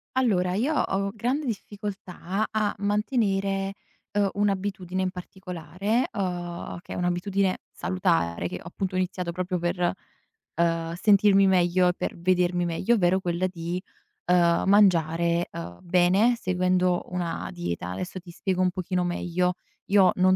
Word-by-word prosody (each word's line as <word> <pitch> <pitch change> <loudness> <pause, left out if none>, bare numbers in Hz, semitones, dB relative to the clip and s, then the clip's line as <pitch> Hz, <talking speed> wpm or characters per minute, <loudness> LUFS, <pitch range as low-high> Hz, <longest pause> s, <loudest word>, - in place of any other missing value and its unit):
Allora, 185 -8 +2
io 270 +10 +1
ho 195 -4 0
grande 255 +7 -1
difficoltà 200 -3 -4
a 215 -1 0
mantenere, 200 -2 0 0.4
uhm, 205 -1 +2
un'abitudine 195 -2 -1
in 185 - 0
particolare, 185 +4 -3
uhm, 175 -3 -4
che - - -13
è - - -5
un'abitudine 185 +2 0
salutare, 170 - 0
che, - - -5
appunto, 185 +2 -4
ho - - +1
iniziato 185 -1 -2
proprio 180 +1 -2
per, 175 0 0 0.7
uhm, 165 -1 +1
sentirmi 200 0 +5
meglio 180 -1 +3
e - - +1
per - - -4
vedermi 175 0 +2
meglio, 175 +7 +1
ovvero 190 -2 +2
quella 175 0 0
di, 175 0 -4 0.5
uhm, 175 -1 +4
mangiare, 170 -4 +3
uhm, 85 +1 -7
bene 185 +7 +3
seguendo 185 -2 +1
una 175 -2 -3
dieta. 85 +1 -4
Adesso 180 - -5
ti 175 -1 -12
spiego 185 +1 -2
un 185 - +4
pochino 180 0 -1
meglio. 175 +1 0 0.4
Io 195 -3 +6
non 185 0 +4
185 Hz, 140 wpm, -26 LUFS, 175-195 Hz, 0.7 s, Io